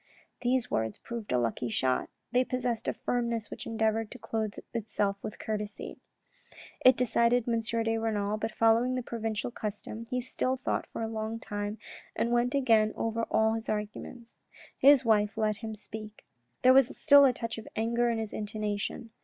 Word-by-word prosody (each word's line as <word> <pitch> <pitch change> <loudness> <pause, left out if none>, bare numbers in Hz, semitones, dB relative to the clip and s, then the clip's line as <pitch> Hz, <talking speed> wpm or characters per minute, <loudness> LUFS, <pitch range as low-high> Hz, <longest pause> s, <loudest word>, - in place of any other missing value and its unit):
These 250 0 +1
words 110 -1 -1
proved 235 -3 -7
a 125 - +3
lucky 120 0 -1
shot. 130 +3 0 0.2
They 250 +1 +4
possessed 250 -3 -2
a - - +1
firmness 235 -2 -2
which - - -7
endeavoured 225 -1 0
to - - -9
clothe 220 -2 -3 0.2
itself 205 -3 -1
with 210 - -6
courtesy. 210 -1 -5 0.8
It 255 0 +7
decided 240 0 +2
M. 230 -1 +2
de 225 0 0
Renal, 215 -2 -1
but 225 +1 -3
following 230 +3 +3
the 255 - -2
provincial 225 -1 -3
custom, 220 +1 -6
he 250 - 0
still 255 +1 -1
thought 255 - -2
for - - -5
a - - -1
long 220 0 -3
time, 205 0 -4 0.4
and 235 - 0
went 240 +2 +2
again 225 -5 +4
over 225 0 -1
all 220 0 +3
his 225 0 -4
arguments; 215 +3 -5 0.4
his 275 -2 +6
wife 210 -2 +3
let 215 -1 +1
him 220 0 -6
speak. 215 0 -9 0.4
There 255 +1 +8
was 265 -1 +4
still 285 -2 +8
a 270 - +6
touch 230 -2 -5
of 220 - -11
anger 235 +2 +1
in 230 - 0
his 220 -2 -4
intonation. 210 +1 -3
225 Hz, 175 wpm, -30 LUFS, 215-240 Hz, 0.8 s, There